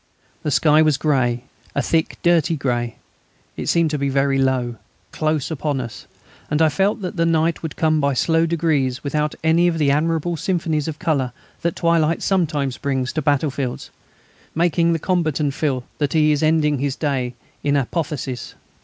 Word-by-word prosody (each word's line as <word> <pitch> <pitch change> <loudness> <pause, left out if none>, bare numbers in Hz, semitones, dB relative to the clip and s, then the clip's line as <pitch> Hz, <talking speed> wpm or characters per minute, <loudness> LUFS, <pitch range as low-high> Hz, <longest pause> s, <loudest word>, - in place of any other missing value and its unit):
The - - -2
sky 150 +2 +4
was 155 -3 +3
grey 130 -5 +1 0.3
a 140 - +2
thick, 160 -1 0
dirty 170 -1 +3
grey; 120 -4 -2 0.6
it - - -5
seemed 170 -2 +2
to 150 - -1
be 140 0 0
very 135 0 +1
low, 130 -3 0 0.3
close 155 -1 -1
upon 145 -2 -1
us, 115 -5 -7 0.4
and 150 - 0
I 160 -1 +5
felt 195 +8 0
that 180 - -4
the 165 - +2
night 165 0 +1
would 160 -2 -5
come 155 -2 +2
by 140 -1 +1
slow 165 +5 +2
degrees 150 -6 0
without 150 +1 -1
any 165 +2 +4
of 170 -2 0
those 145 -3 +3
admirable 165 +3 0
symphonies 160 -3 -1
of 155 -2 -4
colour 140 -8 0 0.3
that 170 -1 -1
twilight 165 -1 +1
sometimes 150 -8 0
brings 130 -2 -1
to 155 - -1
battlefields, 140 -3 -1 0.6
making 170 0 +2
the - - +1
combatant 155 -5 0
feel 135 -4 -1 0.2
that 145 -3 0
he 155 -1 +4
is 150 - +1
ending 155 -2 +2
his 140 0 -1
day 130 -5 -2 0.3
in 145 0 +2
apotheosis. 140 -2 -3
150 Hz, 170 wpm, -21 LUFS, 135-165 Hz, 0.6 s, I